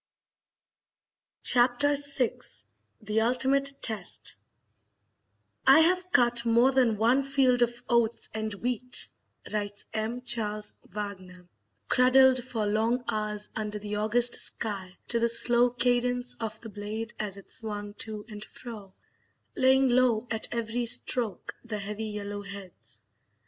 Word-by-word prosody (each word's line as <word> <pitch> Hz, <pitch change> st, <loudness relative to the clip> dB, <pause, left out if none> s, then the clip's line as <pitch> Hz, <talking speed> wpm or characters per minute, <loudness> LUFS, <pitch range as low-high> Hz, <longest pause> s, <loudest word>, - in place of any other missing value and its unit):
Chapter 250 Hz, +4 st, +3 dB
VI 280 Hz, -3 st, 0 dB, 0.6 s
The 215 Hz, +1 st, 0 dB
Ultimate 270 Hz, +4 st, +2 dB
Test 220 Hz, -3 st, +1 dB, 1.3 s
"I 275 Hz, +4 st, +8 dB
have 365 Hz, +2 st, +2 dB
cut 240 Hz, -3 st, +3 dB
more 235 Hz, +3 st, +4 dB
than 250 Hz, -5 st, +2 dB
one 235 Hz, +5 st, +3 dB
field 270 Hz, -3 st, +2 dB
of 240 Hz, 0 st, 0 dB
oats 235 Hz, -1 st, +2 dB
and 220 Hz, 0 st, -3 dB
wheat," 250 Hz, +3 st, -1 dB, 0.5 s
writes 205 Hz, -1 st, -3 dB
M. 225 Hz, +3 st, -3 dB
Charles 215 Hz, -3 st, -1 dB, 0.2 s
Wagner, 185 Hz, -3 st, -7 dB, 0.4 s
"cradled 255 Hz, 0 st, +5 dB
for 230 Hz, -4 st, -3 dB
long 225 Hz, +4 st, 0 dB
hours 210 Hz, -1 st, -2 dB
under 210 Hz, -1 st, -3 dB
the 210 Hz, 0 st, -5 dB
August 235 Hz, +3 st, +4 dB
sky 195 Hz, -4 st, -1 dB
to 235 Hz, -, +2 dB
the 235 Hz, 0 st, +1 dB
slow 240 Hz, +1 st, +3 dB
cadence 245 Hz, 0 st, 0 dB
of 220 Hz, -2 st, -5 dB
the 225 Hz, -, -9 dB
blade 215 Hz, +3 st, -6 dB
as 205 Hz, -2 st, -4 dB
it 200 Hz, -, -14 dB
swung 205 Hz, -2 st, -6 dB
to 215 Hz, -2 st, -6 dB
and 210 Hz, -2 st, -9 dB
fro, 210 Hz, -6 st, -11 dB, 0.6 s
laying 265 Hz, +1 st, +4 dB
low 245 Hz, -2 st, +2 dB
at 220 Hz, -1 st, -1 dB
every 235 Hz, +1 st, -2 dB
stroke 225 Hz, -4 st, +1 dB
the 230 Hz, -3 st, -5 dB
heavy 210 Hz, +2 st, -5 dB
yellow 205 Hz, -1 st, -5 dB
heads. 200 Hz, -2 st, -11 dB
230 Hz, 130 wpm, -28 LUFS, 210-250 Hz, 1.3 s, I